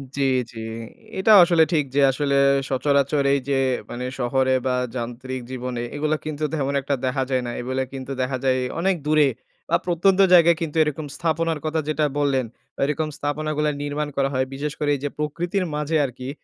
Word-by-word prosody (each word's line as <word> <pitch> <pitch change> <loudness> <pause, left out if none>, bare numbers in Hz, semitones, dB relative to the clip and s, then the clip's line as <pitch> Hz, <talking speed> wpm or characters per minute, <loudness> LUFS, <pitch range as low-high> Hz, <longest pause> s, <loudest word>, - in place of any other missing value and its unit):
জ্বি, 140 - 0 0.3
জ্বি। 115 - -8 0.6
এটাও 210 +2 +7
আসলে 170 -2 +4
ঠিক 150 -3 +2
যে, 145 - +4
আসলে 140 +1 0 0.3
সচরাচর 140 +1 +1
এইযে 140 0 0 0.3
মানে, 125 +1 -5
শহরে 130 +1 +1
বা 125 - +1 0.2
যান্ত্রিক 125 +2 -5
জীবনে, 125 -1 -4
এগুলা 155 +1 0
কিন্তু 155 0 -4
তেমন 140 -2 -1
একটা 140 +1 -1
দেখা 130 +1 0
যায় 130 -1 0
না। 120 - -3
এগুলো 130 +2 -2
কিন্তু 135 0 -6
দেখা 130 0 -1
যায় 130 -1 +2 0.2
অনেক 190 +1 +2
দূরে 150 -1 +4 0.4
বা - - +3
প্রত্যন্ত 185 +2 +2
জায়গায় 170 -2 +6
কিন্তু 160 -2 -3
এরকম 150 0 -3
স্থাপনার 165 -1 -1
কথা 160 +1 0
যেটা 155 0 +1
বললেন, 135 -3 +1 0.4
এরকম 150 +2 0
স্থাপন 145 +1 -3
গুলা 150 0 +2
নির্মাণ 145 +1 -2
করা 135 0 +2
হয়। 130 0 +1
বিশেষ 145 +2 -3
করে 150 - 0
এইযে 140 +1 -3
প্রকৃতির 170 +6 -2
মাঝে 150 +2 -1
আরকি 130 0 -7
145 Hz, 175 wpm, -23 LUFS, 130-155 Hz, 0.6 s, এটাও